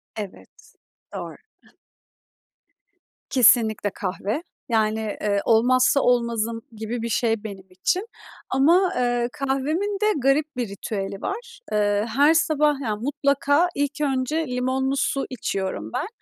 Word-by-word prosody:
Evet. 205 -3 -10 0.4
Doğru. - - -6 1.9
Kesinlikle 230 -4 +4
kahve 200 - -3 0.3
yani, 220 -1 0
ııı, 200 -1 +2
olmazsa 255 +4 +4
olmazım 230 -2 +1
gibi 225 +2 -5
bir 230 - -3
şey 225 -1 0
benim 195 -3 -8
için 275 - -1 0.4
ama, 345 +8 +4
eee, 245 -1 +1
kahvemin 300 +10 -1
de - - +3
garip 285 +3 +1
bir 245 -2 -1
ritüeli 195 0 -5
var. 470 +4 -5
Iıı, 205 0 +1
her 280 +7 +4
sabah 300 -3 +2
yani 215 -3 -2
mutlaka 285 +4 +2
ilk 285 +1 -2
önce 280 +3 0
limonlu 260 +2 -1
su 275 0 0
içiyorum 190 - -3
ben 320 - -2
250 Hz, 120 wpm, -23 LUFS, 220-285 Hz, 1.9 s, Kesinlikle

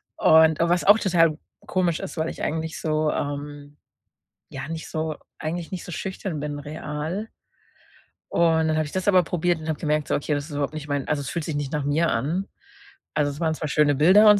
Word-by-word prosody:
Und 160 -1 +5
was 170 +1 +2
auch 205 +2 +8
total 165 -6 +3 0.3
komisch 175 -3 +1
ist, 195 - -6
weil 160 +1 0
ich - - -7
eigentlich 160 +1 -2
so, 155 -1 +1
ähm, 145 0 -5 0.7
ja, 135 -2 -6
nicht 165 0 -5
so 155 -1 -2 0.2
eigentlich 165 +2 -4
nicht 185 - -4
so 180 - -8
schüchtern 190 -4 -4
bin 145 0 -4
real. 155 +7 -4 1.0
Und 160 -1 +3
dann 155 - +1
habe 155 0 +1
ich 145 - -8
das 185 +1 -3
aber 185 -3 +6
probiert 175 0 0
und 155 - -6
habe 155 - -2
gemerkt, 150 -1 0
so: - - +2
„Okay, 145 +1 -1
das 145 0 -1
ist 160 - -11
überhaupt 145 +1 -2
nicht 150 -1 -7
mein 145 -1 -1
also, 150 -1 0
es 135 - -5
fühlt 170 -3 -3
sich 160 - -3
nicht 145 -2 -2
nach 150 -2 -1
mir 155 +4 +2
an.“ 155 +12 -1 0.7
Also, 145 -1 +2
es 140 - -9
waren 160 -2 +1
zwar 155 - -4
schöne 145 -1 +3
Bilder 190 +9 +7
und 210 -1 +7
155 Hz, 215 wpm, -24 LUFS, 145-170 Hz, 1.0 s, auch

